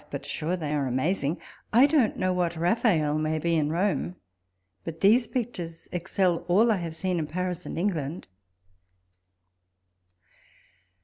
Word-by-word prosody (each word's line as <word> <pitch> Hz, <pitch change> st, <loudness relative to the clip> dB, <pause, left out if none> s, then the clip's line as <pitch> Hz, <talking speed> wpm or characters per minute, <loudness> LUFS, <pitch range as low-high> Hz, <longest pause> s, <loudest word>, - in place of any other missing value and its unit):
But -, -, -6 dB
sure 165 Hz, +4 st, -2 dB
they 150 Hz, -3 st, -2 dB
ai 145 Hz, -2 st, 0 dB
e -, -, -1 dB
amazing! 145 Hz, +4 st, 0 dB, 0.3 s
I 245 Hz, +5 st, +7 dB
don't 285 Hz, -6 st, +2 dB
know 185 Hz, 0 st, +1 dB
what 175 Hz, -1 st, 0 dB
Raphael 165 Hz, -4 st, +2 dB
may 155 Hz, 0 st, 0 dB
be 170 Hz, +2 st, 0 dB
in 150 Hz, -2 st, +1 dB
Rome, 180 Hz, 0 st, 0 dB, 0.7 s
but 165 Hz, -1 st, -7 dB
these 225 Hz, +4 st, +5 dB
pictures 180 Hz, -10 st, -5 dB
excel 180 Hz, 0 st, +1 dB
all 215 Hz, +6 st, +4 dB
I 210 Hz, -, +2 dB
have 165 Hz, -3 st, -5 dB
seen, 180 Hz, +1 st, -1 dB
in 155 Hz, -, -2 dB
Paris 180 Hz, +1 st, -3 dB
and -, -, -5 dB
England. 170 Hz, -3 st, -2 dB
175 Hz, 145 wpm, -27 LUFS, 160-195 Hz, 0.7 s, I